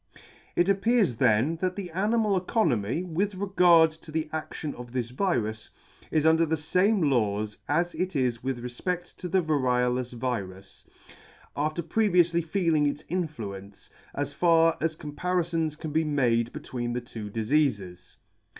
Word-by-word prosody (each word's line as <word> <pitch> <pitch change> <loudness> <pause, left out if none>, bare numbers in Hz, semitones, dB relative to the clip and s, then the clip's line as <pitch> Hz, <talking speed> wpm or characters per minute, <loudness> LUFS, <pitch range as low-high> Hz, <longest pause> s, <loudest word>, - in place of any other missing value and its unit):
It 175 - +3
appears 200 - +2
then 120 +12 +2
that 185 +1 -1
the 190 -4 -6
animal 210 +3 +1
economy, 170 - 0
with 185 +4 -2
regard 180 -4 +5
to 160 0 -14
the 155 0 -2
adlion 155 -1 -4
of 120 0 -10
this 120 -2 -2
virus, 120 - -1 0.4
is 155 -1 +1
under 160 +1 +5
the 160 0 0
fame 185 +6 +2
laws 105 -3 0
as 170 +5 +1
it 185 -1 -3
is 125 -4 0
with 130 -2 -3
refped: 175 +9 -4
to 180 - -5
the 185 +1 +2
variolous 125 -4 +1
virus, 100 -6 -5 0.7
after 155 +4 -1
previoufly 175 -2 +2
feeling 160 -3 +1
its 145 +1 -3
influence, 105 - -5 0.2
as - - -3
far 165 -1 +4
as 160 0 0
comparifons 165 0 -2
can 155 -1 -6
be 160 +2 +2
made 120 -6 +1
between 120 -1 -5
the 125 - -2
two 110 -3 -8
difeafes. 105 - -1
155 Hz, 145 wpm, -27 LUFS, 120-175 Hz, 0.7 s, regard